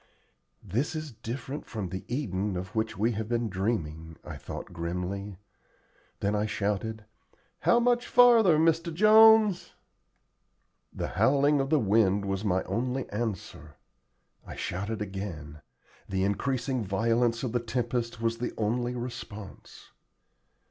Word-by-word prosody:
"This 120 - -2
is 155 -2 -5
different 125 +5 -6
from 105 -6 -4
the 95 +1 -5
Eden 105 -7 -2
of 95 +2 -6
which 110 -2 -2
we 110 +4 +2
have 110 0 -4
been 120 -1 0
dreaming," 80 -6 -3
I - - -7
thought - - -8
grimly. 90 +4 -4 0.8
Then 100 +1 +1
I 105 0 0
shouted, 105 +2 -2 0.5
"How 235 - +4
much 245 0 +2
farther, 230 -9 +6
Mr. 165 +1 +2
Jones?" 215 +1 +6 1.2
The - - -4
howling 140 +8 +3
of 135 - -2
the 155 - +4
wind 100 -3 +2
was 95 0 -2
my 95 -3 +1
only 130 +2 -2
answer. 100 -8 -5 0.7
I - - -9
shouted 105 +4 -3
again. 85 -7 -7 0.5
The 95 0 0
increasing 125 +4 -1
violence 115 +4 +1
of 125 - -2
the 120 - +1
tempest 120 -1 -2
was 115 0 -1
the 120 - -3
only 120 +3 -1
response. 115 -4 -8
115 Hz, 130 wpm, -28 LUFS, 100-130 Hz, 1.2 s, farther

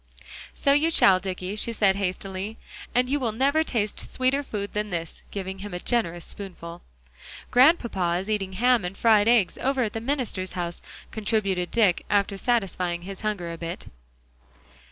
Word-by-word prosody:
"So 280 - +3
you 300 +3 +3
shall, 195 - +5
Dicky," 185 +1 -4
she 225 +2 0
said 200 -4 +3
hastily. 195 +2 -3 0.4
"And 250 +1 +3
you 285 +3 0
will 240 -4 0
never 280 +7 +2
taste 215 -8 -2
sweeter 260 +2 +1
food 205 -7 -5
than 210 0 -2
this," 165 -3 -5
giving 190 -1 -5
him 200 -1 -6
a - - -3
generous 175 -7 -1
spoonful. 175 -4 -8 0.7
"Grandpapa 235 - +4
is 190 - -6
eating 200 -3 -1
ham 245 +2 +3
and 180 +2 -5
fried 215 -2 +4
eggs 230 -6 +3
over 270 -1 +1
at 215 - -3
the 225 - -3
minister's 235 -8 -2
house," 175 -2 -4 0.3
contributed 200 -5 -1
Dick, 205 -7 +2
after 200 0 +2
satisfying 185 -6 -1
his 195 +1 -7
hunger 200 -6 -2
a 165 - -7
bit. 170 0 -5
205 Hz, 165 wpm, -25 LUFS, 185-235 Hz, 0.7 s, shall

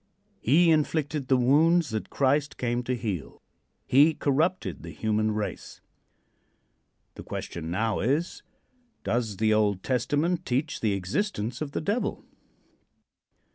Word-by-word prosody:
He 165 +7 +4
inflicted 150 -2 0
the 130 - +4
wounds 155 +6 +3
that 110 -1 -3
Christ 140 +1 +1
came 120 0 -1
to 125 - 0
heal. 105 - -5 0.5
He 150 +4 +5
corrupted 145 - 0
the - - -8
human 110 0 0
race. 105 -1 -5 1.3
The - - -10
question 80 -1 -6
now 110 +4 0
is: 145 - -1 0.6
Does 110 -4 -1
the 110 +1 +2
Old 105 -3 +1
Testament 145 +7 0
teach 135 +4 -1
the 110 -3 +1
existence 105 - -2
of 145 -2 -4
the - - -2
Devil? 205 +9 -2
130 Hz, 125 wpm, -27 LUFS, 110-155 Hz, 1.3 s, He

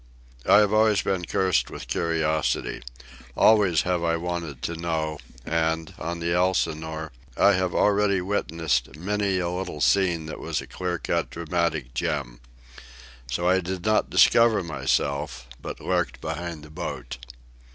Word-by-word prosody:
I - - +7
have 105 0 +2
always 110 -1 +4
been 95 -2 -1
cursed 95 -1 +1
with - - -8
curiosity. 80 -2 0 0.6
Always 100 -7 +5
have 90 -2 0
I 85 0 +1
wanted 85 -5 -4
to 85 - -2
know; 80 -2 -2 0.3
and, 80 0 -1
on 85 +1 -4
the 85 0 -1
Elsinore, 80 -3 0 0.3
I 100 - +6
have 90 -2 0
already 100 -1 +3
witnessed 80 -8 -1
many 100 +3 -1
a 90 -1 -1
little 90 -3 -4
scene 90 -1 +2
that 80 - -7
was - - -2
a - - -7
clean 90 -1 -3
cut - - 0
dramatic 85 -6 -2
gem. 60 -1 -2 0.9
So 85 +9 -1
I 95 +1 +4
did 90 +1 -5
not 110 0 +2
discover 115 -4 +5
myself, 70 -5 -1
but - - -6
lurked - - -1
behind 85 -3 -5
the 75 - -13
boat. 60 -4 -6
85 Hz, 145 wpm, -25 LUFS, 80-95 Hz, 0.9 s, I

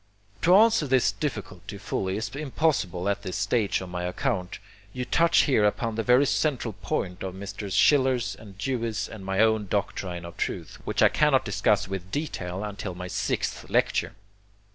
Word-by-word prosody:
To 180 +2 +6
answer 215 -7 +5
this 130 -1 +3
difficulty 105 - -5
fully 95 -1 -2
is 110 +5 -4
impossible 135 - 0
at 100 0 0
this 95 -2 -4
stage 100 +1 +1
of 95 - -7
my 90 0 -4
account. 90 +1 -2 0.4
You 125 -1 -3
touch 170 +6 +4
here 130 -7 +3
upon 115 +2 +1
the 115 - -1
very 125 +4 +4
central 130 -6 0
point 90 -2 -3
of 95 -1 -5
Messrs. 100 0 -5
Schiller's, 130 -8 +3 0.2
Dewey's 115 -1 -2
and 110 -3 -10
my 95 +2 0
own 110 -2 +3
doctrine 90 -3 -3
of 85 - -10
truth, - - -4
which - - +1
I - - +7
cannot 150 -3 +3
discuss 105 0 +1
with 95 -1 -5
detail 95 - -4
until 100 -3 -5
my 90 0 -6
sixth - - -2
lecture. - - +1
105 Hz, 165 wpm, -26 LUFS, 95-130 Hz, 0.4 s, I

